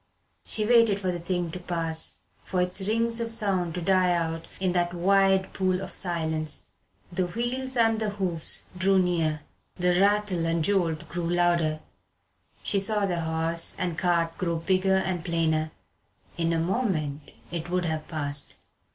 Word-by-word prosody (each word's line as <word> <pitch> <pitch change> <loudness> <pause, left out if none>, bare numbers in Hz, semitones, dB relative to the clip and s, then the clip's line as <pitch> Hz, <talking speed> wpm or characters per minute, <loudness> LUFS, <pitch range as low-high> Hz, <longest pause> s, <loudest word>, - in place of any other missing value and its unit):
She 215 - 0
waited 230 -3 +5
for 185 -2 -1
the 175 - -4
thing 175 -1 -2
to 180 - -6
pass, 165 -2 -1 0.2
for 185 - -2
its 180 +2 0
rings 230 +1 +2
of 230 0 -3
sound 190 -7 0
to 180 - -3
die 185 0 +3
out 165 -1 -2
in 185 -1 +1
that 175 0 0
wide 195 +1 +3
pool 185 -1 +1
of 190 0 -6
silence. 160 -3 -1 0.5
The 180 0 0
wheels 250 +6 -2
and 225 -1 +3
the 215 -1 -1
hoofs 185 -5 -2
drew 190 +2 +3
near. 165 -4 +1 0.3
The 180 0 +2
rattle 200 -4 +2
and 165 -1 +1
jolt 170 -5 0
grew 170 -1 -3
louder. 170 -3 +2 0.8
She 200 - +1
saw 210 +1 +2
the 175 -3 -1
horse 165 +1 -1
and 175 -3 -2
cart 170 -1 +1
grow 170 -2 0
bigger 190 +3 +2
and 185 -3 -1
plainer. 160 -3 +1 0.7
In 165 -1 0
a 165 - +1
moment 165 - -1 0.2
it 170 0 -4
would 180 0 0
have 160 -2 -2
passed. 145 -2 -3
175 Hz, 160 wpm, -27 LUFS, 165-195 Hz, 0.8 s, waited